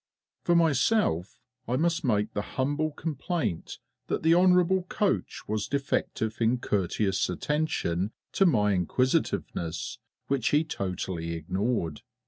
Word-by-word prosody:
For 175 - +2
myself, 160 - +2 0.3
I 120 - 0
must 170 +4 +1
make 105 -5 +1
the 105 - -1 0.2
humble 145 +4 +1
complaint 155 - -3 0.3
that - - -2
the 160 - +4
Hon'ble 180 +1 +4
Coach 205 -3 -1
was 105 -1 -1
defective 135 -5 -1
in 115 +2 +3
courteous 95 -3 0
attention 100 - -1 0.2
to 195 - +4
my 105 - +3
inquisitiveness, 90 - -1 0.3
which 135 -4 +1
he 150 +2 +3
totally 90 - -3
ignored. 90 0 -2
125 Hz, 115 wpm, -28 LUFS, 95-160 Hz, 0.3 s, the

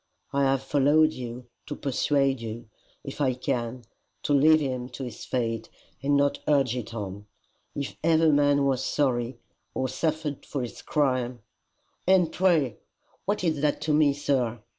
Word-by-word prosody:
I 140 - +2
have 135 0 +1
followed 150 +3 +3
you 125 0 -7 0.2
to 145 - -4
persuade 135 -1 +1
you, 115 0 -6 0.4
if - - -6
I 130 -3 +2
can, 120 0 -3 0.4
to 145 - +1
leave 155 +3 +6
him 130 -4 -3
to 135 - -7
his 120 -4 -7
fate 115 -3 -2 0.3
and 140 +1 +2
not 140 0 +2
urge 135 -5 +3
it 120 -3 -5
on. 100 -2 -6 0.5
If 140 -1 -4
ever 160 -1 +4
man 145 -1 +3
was 130 -1 +1
sorry, 125 -4 0 0.4
or 130 - 0
suffered 150 +1 -2
for 140 -3 -4
his 120 - -7
crime, 130 -5 0 0.3
" - - -44
"And 180 -3 +4
pray 160 - +2 0.5
what 205 -1 -1
is 160 -5 0
that 150 -1 +1
to 155 - 0
me, 150 -2 +4
sir?" 125 -6 -1
135 Hz, 160 wpm, -26 LUFS, 125-150 Hz, 0.5 s, leave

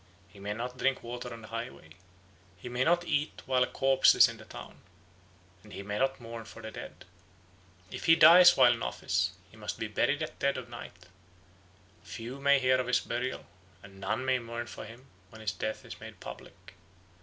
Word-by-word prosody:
He 100 +1 -16
may 100 +1 -4
not 125 +3 -5
drink 135 0 +1
water 120 +1 -6
on 115 -1 -9
the 105 - -11
highway. 115 -7 -7 0.7
He 110 +7 -8
may 125 +1 0
not 175 +4 +3
eat 150 -2 -1
while 130 -1 +2
a 125 - +4
corpse 135 -1 +4
is - - +8
in - - -7
the - - -13
town, - - -11 0.8
and 105 +1 -15
he 100 - -6
may 105 +1 -3
not 135 0 +1
mourn 115 -1 -8
for - - -12
the 110 - -6
dead. - - -10 0.9
If - - -6
he 165 - +7
dies 170 +3 +8
while - - +7
in - - -6
office, 90 +10 -1 0.2
he 110 - -17
must 105 -1 -5
be 110 - -3
buried 140 +7 0
at - - -7
dead 140 0 +1
of 125 -2 -7
night; 90 -7 -10 1.0
few 115 +10 -8
may 140 0 +5
hear 130 -1 +3
of 125 - -2
his 125 - +2
burial, 125 +2 -3 0.4
and 95 -1 -14
none 105 +7 -2
may 130 -1 +2
mourn 115 0 -5
for - - -9
him 115 +5 -13 0.2
when 110 - -13
his 110 -1 -2
death 110 0 -4
is - - -9
made - - -11
public. - - -11
120 Hz, 205 wpm, -30 LUFS, 110-130 Hz, 1.0 s, is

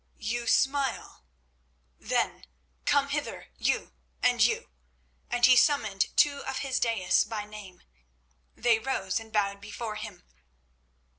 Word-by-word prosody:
You 235 +2 -3
smile? 270 - 0 0.7
Then - - -1 0.4
come - - +3
hither - - -4
you—and 60 0 0
you." - - +1 0.6
And 245 0 +3
he 255 0 +7
summoned 220 -9 +3
two 285 -1 +4
of 270 - -4
his 265 -2 0
daïs 225 -7 +2
by 210 -2 -4
name. 210 -3 -12 0.7
They 230 -2 +3
rose 220 -6 -1
and 225 0 -12
bowed 200 -2 0
before 210 +1 -6
him. 210 -5 -8
220 Hz, 120 wpm, -28 LUFS, 200-245 Hz, 0.7 s, he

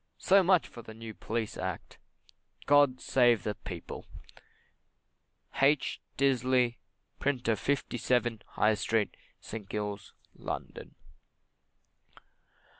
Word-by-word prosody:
So 195 +1 +5
much 185 -1 +3
for 120 - -11
the 110 -1 -11
New 115 0 -8
Police 110 0 -3
Act. 95 -2 -5 0.7
God 145 -3 +5
save 120 -4 +3
the 105 - -1
People! 90 -4 -8 1.5
H. 140 +1 +3 0.2
Disley, 130 -2 +2 0.4
Printer, 125 -5 +1
57, 120 -3 0
High 110 +1 +2
Street, 110 0 0 0.3
St. 105 -3 -8
Giles, 105 -1 -4 0.2
London. - - -6
120 Hz, 95 wpm, -30 LUFS, 110-130 Hz, 1.5 s, So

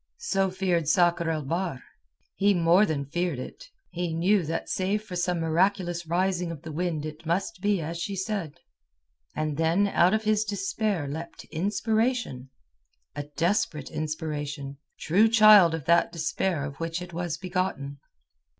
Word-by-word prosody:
So 195 - 0
feared 180 -4 0
Sakr 170 0 +3
el 155 -2 -1
Bahr. 165 -2 -3 0.5
He 200 0 +2
more 175 +4 +4
than 145 -4 -2
feared 175 +1 -2
it. - - -9 0.2
He 175 -2 -3
knew 185 +3 +3
that 165 +1 -3
save 200 +3 -1
for 200 -4 -8
some 180 -1 0
miraculous 175 +1 0
rising 180 +1 0
of 165 -4 -7
the 160 - -7
wind 160 -1 -2
it 155 +1 -8
must 185 +5 -2
be 205 -3 +1
as 165 +2 -5
she 200 +2 -3
said. 190 -5 -4 0.8
And 155 -2 -2
then 165 +5 +2
out 180 +1 +4
of 220 - -1
his 215 0 +2
despair 200 -4 -2
leapt 160 +4 -7
inspiration—a 150 - -3
desperate 170 -4 0
inspiration, 150 -3 -4 0.2
true 200 +8 +4
child 215 -6 +7
of 155 -4 -7
that 170 0 +3
despair 165 -1 -1
of 140 -1 -7
which 165 +1 -2
it 180 -1 -9
was 175 -1 -3
begotten. 180 -7 -3
175 Hz, 150 wpm, -27 LUFS, 155-195 Hz, 0.8 s, child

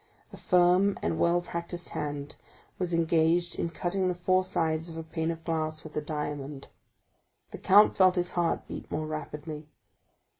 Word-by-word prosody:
A - - -9
firm 180 +2 +3
and 85 -1 -1
well 175 +1 +3
practised 170 0 -5
hand 145 -1 -4 0.4
was 180 -2 -1
engaged 165 +1 +2
in 170 - 0
cutting 185 +2 -1
the 180 - 0
four 185 +1 +2
sides 165 -3 -1
of 165 - -8
a 165 - -4
pane 160 0 -3
of 165 -1 -4
glass 155 -1 -2
with 155 - -11
a 150 - 0
diamond. 145 -2 -5 0.8
The - - -8
count 205 +3 +6
felt 185 -2 +5
his 175 -1 0
heart 170 -2 0
beat - - -8
more 155 +1 -2
rapidly. 155 0 -6
165 Hz, 165 wpm, -28 LUFS, 155-175 Hz, 0.8 s, count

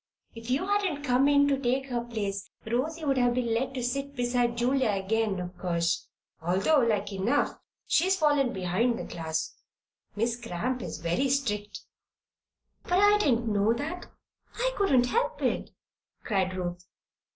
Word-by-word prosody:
If 230 +1 -9
you 270 +8 +1
hadn't 390 -8 0
come 260 0 +3
in 285 0 +5
to 275 -1 +1
take 265 +1 0
her 240 -1 -1
place, 205 -4 -4 0.2
Rosy 300 +8 -2
would 270 -2 +2
have 245 -1 +3
been 240 -2 0
let 265 +3 -1
sit 275 +3 -2
beside 245 -1 0
Julia 255 0 +2
again, 205 0 0
of 180 0 -6
course, 170 -1 0 0.3
although 190 - +3
like 210 -4 0
enough 195 +4 +1 0.3
she's 380 +2 +3
fallen 290 -6 +3
behind 195 +6 0
the - - -5
class. 160 -1 -3 0.6
Miss 235 +3 -1
Cramp 240 +4 -3
is 165 -6 -5
very 175 +12 0
strict." 210 -7 -1 1.0
"But - - -5
I 410 +1 +5
didn't 240 - +2
know 205 +2 +3
that. 315 +9 -5 0.5
I - - 0
couldn't 270 -12 +3
help 475 - 0
it," - - 0 0.5
cried 190 -3 0
Ruth. 175 -1 -4
240 Hz, 150 wpm, -28 LUFS, 200-275 Hz, 1.0 s, in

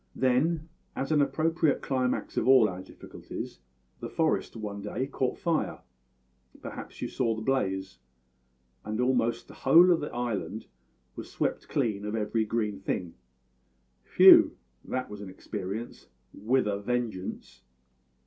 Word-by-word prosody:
"Then, 150 +6 +1 0.3
as 135 +3 -3
an 150 -2 +4
appropriate 155 +2 +1
climax 130 -2 -1
of - - 0
all 130 -4 +7
our 90 -2 -6
difficulties, - - -9 0.4
the - - -6
forest - - 0
one 105 -2 -5
day 105 +5 -3
caught 130 -2 -2
fire 165 -2 -1 0.8
perhaps - - -8
you - - -1
saw 115 -3 -1
the 110 - -6
blaze? 95 - -1 0.8
and 110 +1 -4
almost 125 -2 +1
the - - -13
whole 170 +7 +6
of 170 - +3
the 150 - -5
island 120 -4 -3 0.5
was - - -8
swept - - -2
clean 105 -3 -1
of 105 +1 -3
every 110 +1 0
green 105 -3 -2
thing. 90 -3 -3 0.9
Phew! - - +7 0.3
that 130 0 -3
was 105 0 -9
an 100 - -7
experience, 95 +4 -6 0.3
with 125 +5 +1
a 100 -1 -1
vengeance! 110 -4 -4
115 Hz, 140 wpm, -28 LUFS, 105-135 Hz, 0.9 s, all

